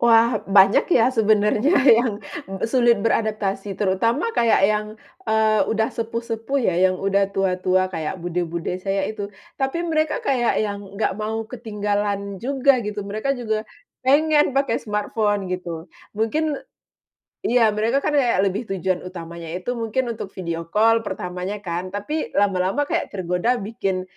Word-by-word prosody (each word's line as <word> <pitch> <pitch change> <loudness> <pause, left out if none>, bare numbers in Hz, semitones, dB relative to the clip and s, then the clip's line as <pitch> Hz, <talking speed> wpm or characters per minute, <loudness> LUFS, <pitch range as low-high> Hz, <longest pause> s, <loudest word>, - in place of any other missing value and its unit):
Wah, 230 -1 +4
banyak 195 0 +5
ya, 245 +2 +4
sebenarnya 215 - +3
yang 240 -3 +5 0.5
sulit 240 0 +3
beradaptasi, 210 -3 -1
terutama 230 - +1
kayak 235 - +3
yang, 210 +1 +2 0.4
eee, 220 -1 +3
udah 220 0 0
sepuh-sepuh 230 +2 -3
ya, 225 -10 +1
yang 185 - -2
udah 195 +1 +1
tua-tua 185 0 +1
kayak 160 +2 -3
bude-bude 175 0 -3
saya 195 0 -1
itu. 205 -1 -4 0.3
Tapi 270 +6 -1
mereka 315 +6 0
kayak 250 - +1
yang 205 -1 -1 0.2
enggak 215 - 0
mau 220 +1 -2
ketinggalan 205 -4 -3
juga 270 +1 +2
gitu, 210 -2 -4
mereka 215 +7 -2
juga 220 -3 -1 0.4
pengen 295 +1 +3
pakai 275 -4 +1
smartphone 210 -1 -1
gitu. 170 -3 -5 0.3
Mungkin 295 +8 0 0.9
iya, 230 -2 +4
mereka 225 +6 0
kan - - 0
kayak 250 -9 +2
lebih 200 +4 -1
tujuan 185 0 -2
utamanya 170 -2 -8
itu 185 +6 -4
mungkin 235 +2 -1
untuk 210 -4 -6
video 170 -2 -4
call 225 +6 +3
pertamanya 185 +2 -4
kan, 180 +1 -4
tapi 255 +11 -3
lama-lama 195 +5 +1
kayak 290 - -1
tergoda 180 +5 0
bikin, 195 -3 -2
215 Hz, 140 wpm, -22 LUFS, 190-235 Hz, 0.9 s, banyak